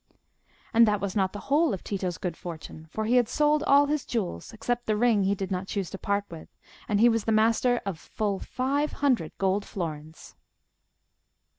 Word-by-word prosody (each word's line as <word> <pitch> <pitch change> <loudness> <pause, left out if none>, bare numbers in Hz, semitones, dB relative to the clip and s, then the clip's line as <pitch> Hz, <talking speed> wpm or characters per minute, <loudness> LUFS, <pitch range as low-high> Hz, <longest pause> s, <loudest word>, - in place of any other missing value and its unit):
And 230 0 +6
that 210 -1 +2
was 195 -2 -3
not 190 -2 +1
the 205 - -7
whole 305 -7 +3
of 185 - -12
Tito's 185 -4 -3
good 175 -3 -4
fortune; 160 -2 -9
for 220 +6 -3
he 240 +3 +3
had 240 -2 +3
sold 300 0 +2
all 285 -1 +5
his 295 -1 -1
jewels, 190 - -3
except 240 +2 -3
the 215 -1 +1
ring 220 -4 +3
he 200 +1 +2
did 195 -1 -5
not 185 +1 -2
choose 195 -5 -3
to 195 - -7
part 200 0 0
with, 160 -2 -10 0.4
and 205 -1 +2
he 235 - +7
was 230 -2 +1
master 230 +3 +3
of 190 -5 -4
full 205 0 -2
five 280 +4 -1
hundred 250 - +1
gold 195 +1 +1
florins. 160 -5 -7
210 Hz, 190 wpm, -27 LUFS, 190-240 Hz, 0.4 s, he